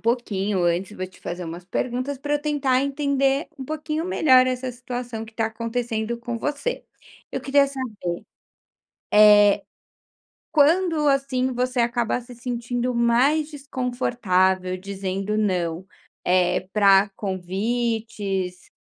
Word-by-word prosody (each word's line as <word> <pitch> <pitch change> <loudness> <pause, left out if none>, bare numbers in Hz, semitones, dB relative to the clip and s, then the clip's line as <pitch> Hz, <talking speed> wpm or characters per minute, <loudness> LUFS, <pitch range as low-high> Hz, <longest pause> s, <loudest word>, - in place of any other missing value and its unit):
pouquinho, 210 -5 0
antes 180 +4 0
vou 185 - -3
te 185 - -19
fazer 175 +1 -5
umas 170 +2 -7
perguntas 255 +7 -2
pra 290 +2 -1
eu - - +2
tentar 275 -3 +1
entender 280 0 0
um 265 - -5
pouquinho 310 +2 -3
melhor 260 -8 +5
essa 255 0 -2
situação 245 -2 -6
que 225 - -14
tá 225 0 0
acontecendo 230 0 -3
com 235 0 -4
você. 295 - -3 0.5
Eu - - -3
queria 280 0 +3
saber, 230 -11 -5 0.9
eh, 210 -1 +7 0.9
quando, 320 +1 +3
assim, 270 -2 +1
você 250 +1 -1
acaba 235 0 +1
se 245 0 -12
sentindo 245 +1 -2
mais 255 +6 +3
desconfortável 235 - 0
dizendo 195 +1 -3
não, 180 -4 -1 0.4
eh, 180 0 +2
pra 200 -1 +5
convites, 200 -1 -2
235 Hz, 120 wpm, -23 LUFS, 195-265 Hz, 0.9 s, eh